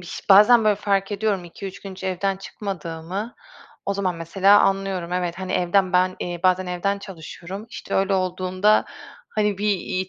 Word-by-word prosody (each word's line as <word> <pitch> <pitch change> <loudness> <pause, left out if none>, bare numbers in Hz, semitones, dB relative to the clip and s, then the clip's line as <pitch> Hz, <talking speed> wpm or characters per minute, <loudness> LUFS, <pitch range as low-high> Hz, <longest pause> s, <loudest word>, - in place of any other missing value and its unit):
biş 180 - -8
bazen 210 +4 +7
böyle 210 -1 +4
fark 195 -1 0
ediyorum 200 -3 -1
2-3 195 +3 -9
gün 195 - -8
hiç 190 - -10
evden 190 +1 -1
çıkmadığımı. 190 +1 -6 0.5
O 200 - 0
zaman 190 -3 -1
mesela 195 +5 +4
anlıyorum. 195 -3 0
Evet, 180 -1 -2
hani 185 0 -4
evden 180 +1 +2
ben, 185 0 +2
eee, 175 -1 -4
bazen 185 0 +2
evden 190 +3 -1
çalışıyorum. 190 +2 -9
İşte 255 - -6
öyle 195 0 +2
olduğunda, 185 +2 +1 0.4
hani, 210 -2 0
bir, 210 - -1
iii, 185 -1 -1
190 Hz, 165 wpm, -23 LUFS, 180-200 Hz, 0.5 s, bazen